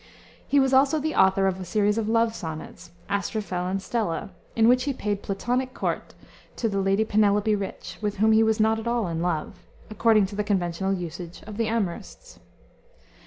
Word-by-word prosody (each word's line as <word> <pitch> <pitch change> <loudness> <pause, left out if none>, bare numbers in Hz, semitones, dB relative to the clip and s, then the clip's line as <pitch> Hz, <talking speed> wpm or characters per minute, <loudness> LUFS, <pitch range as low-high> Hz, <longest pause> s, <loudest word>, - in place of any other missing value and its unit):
He 285 - +4
was 265 -1 +2
also 275 +4 +4
the 310 +1 -2
author 190 0 +4
of 190 -1 0
a - - -5
series 205 +4 +1
of 220 -1 -2
love 230 0 +2
sonnets, 165 0 -7 0.2
Astrophel 200 -2 -2
and 195 +1 -1
Stella, 195 -4 -2 0.2
in 225 0 +4
which 250 +1 +4
he 280 - 0
paid 205 -5 -3
Platonic 250 +6 -2
court - - -3 0.4
to 230 - -1
the 200 -2 -1
Lady 195 +3 +2
Penelope 210 0 +2
Rich 200 -2 -5
(with 210 -1 -2
whom 220 +2 +4
he 220 0 +5
was 220 0 +2
not 220 +1 +3
at 225 - -6
all 235 -4 0
in 165 -1 -3
love), 175 +1 -2 0.3
according 215 -1 +4
to 200 +2 -7
the 210 - 0
conventional 190 -2 -1
usage 175 -2 -5
of 210 -1 -8
the 230 -1 0
amourists. 225 - -4
210 Hz, 190 wpm, -25 LUFS, 190-225 Hz, 0.4 s, he